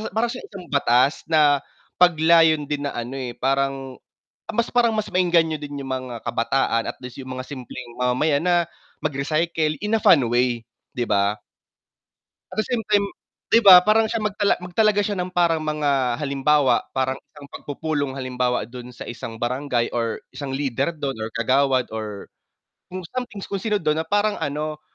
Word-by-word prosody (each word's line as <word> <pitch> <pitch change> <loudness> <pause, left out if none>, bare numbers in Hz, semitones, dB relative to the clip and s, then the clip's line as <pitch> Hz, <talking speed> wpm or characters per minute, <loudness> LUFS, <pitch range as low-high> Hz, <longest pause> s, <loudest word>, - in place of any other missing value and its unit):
para 225 +2 +2
siyang 250 - -8
isang 190 -3 -9
batas 140 0 +2
na 150 -3 +4 0.4
pag-layon 160 -2 +5
din 145 0 -3
na - - -3
ano, 120 +2 -5
eh, 125 -2 -4
parang, 135 0 -1 0.6
mas 230 +1 0
parang 240 -1 +3
mas 215 -1 -1
maengganyo 170 -3 +3
din 145 -1 -6
yung 135 - -6
mga 125 -3 -7
kabataan 115 -1 0
at - - -25
least 125 +1 -9
yung 130 0 -8
mga 130 0 -6
simpleng 130 -2 -8
mamamayan 140 +4 +1
na, 175 -1 +3 0.5
mag-recycle 155 +2 0
in 210 +2 +1
a 220 - 0
fun 145 -6 +6
way, 120 -1 +1 0.3
'di 120 -2 -1
ba? 100 0 +1 1.1
At - - -8
the - - -9
same 245 -3 -1
time 205 -1 +4 0.4
'di 230 - +4
ba 190 -4 +11
parang 220 +1 +4
siya 230 - 0
magtala 210 -1 +1
magtalaga 205 +4 +1
siya 205 0 -1
ng 180 - -5
parang 170 -3 +2
mga 140 -5 0
halimbawa 140 -1 +2
parang 130 0 0 0.2
isang 145 -1 -13
pagpupulong 145 -2 -3
halimbawa 125 -2 -1
dun 125 +1 -10
sa 125 - -10
isang 120 -1 -7
barangay, 125 0 -1
or 115 -1 -1 0.2
isang 140 -2 -5
leader 135 +1 -1
dun, 140 -3 -3
or 110 0 -4
kagawad, 130 +2 +2
or 105 -2 -6 0.6
kung 185 0 -7
something 245 -5 -5
kung 195 - -4
sino 210 +1 0
dun 155 -4 0
na 160 - -4
parang 205 +2 +1
ano 150 +1 -3
145 Hz, 170 wpm, -23 LUFS, 125-175 Hz, 1.1 s, ba